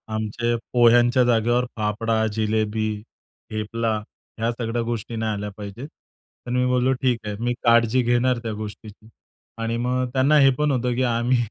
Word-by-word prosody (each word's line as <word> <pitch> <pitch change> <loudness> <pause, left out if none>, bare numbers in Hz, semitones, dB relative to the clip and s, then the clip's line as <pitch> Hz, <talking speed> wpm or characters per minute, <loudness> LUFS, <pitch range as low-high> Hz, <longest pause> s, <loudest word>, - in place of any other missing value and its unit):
आमचे 120 +2 -1 0.2
पोह्यांच्या 120 +1 +5
जागेवर 120 +1 +2
फाफडा, 110 +1 0
जिलेबी, 110 0 0 0.6
थेपला 110 +1 -2 0.4
ह्या 115 +1 +1
सगळ्या 115 0 -3
गोष्टी 115 0 -4
नाही 110 -1 -1
आल्या 105 0 -4
पाहिजेत. 105 +6 -7 0.6
तर - - -4
मी 125 0 +1
बोललो 125 0 +2
ठीक 125 -3 +1
आहे, 105 -1 -3
मी 120 +1 0
काळजी 115 +1 +4
घेणार 120 +1 +2
त्या 115 - -3
गोष्टीची. 105 0 -9 0.5
आणि 115 +1 -1
मग 125 +2 0
त्यांना 135 +3 +3
हे 135 -1 +6
पण 150 -1 +1
होतं, 125 -2 0
की 130 - +1
आम्ही 120 +1 +1
115 Hz, 155 wpm, -23 LUFS, 110-125 Hz, 0.6 s, हे